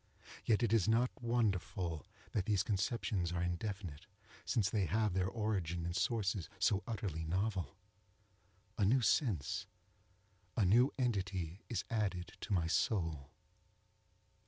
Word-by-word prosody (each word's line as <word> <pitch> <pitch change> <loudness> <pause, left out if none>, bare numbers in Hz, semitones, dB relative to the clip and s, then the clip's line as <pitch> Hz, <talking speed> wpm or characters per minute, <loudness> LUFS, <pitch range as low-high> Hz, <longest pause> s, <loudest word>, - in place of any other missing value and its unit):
Yet 115 +1 +3
it 115 -2 +2
is 110 -4 +4
not 115 +3 +3
wonderful 95 -8 0 0.2
that 95 - 0
these 105 -3 +2
conceptions 100 -3 0
are 90 0 -1
indefinite, 90 -2 -4 0.4
since 110 -7 +2
they 95 -1 +1
have 105 +3 +1
their 90 0 +1
origin 95 -6 -1
in 85 - -2
sources 100 -2 0
so 100 +2 +2
utterly 95 -8 -3
novel. 95 -1 -1 1.0
A - - +3
new 125 +7 +4
sense—a 95 - -2
new 120 +9 +5
entity 95 - -1
is 115 - -1
added 95 -6 -1
to - - -6
my 90 -4 +2
soul. 80 -6 0
95 Hz, 125 wpm, -36 LUFS, 90-110 Hz, 1.0 s, new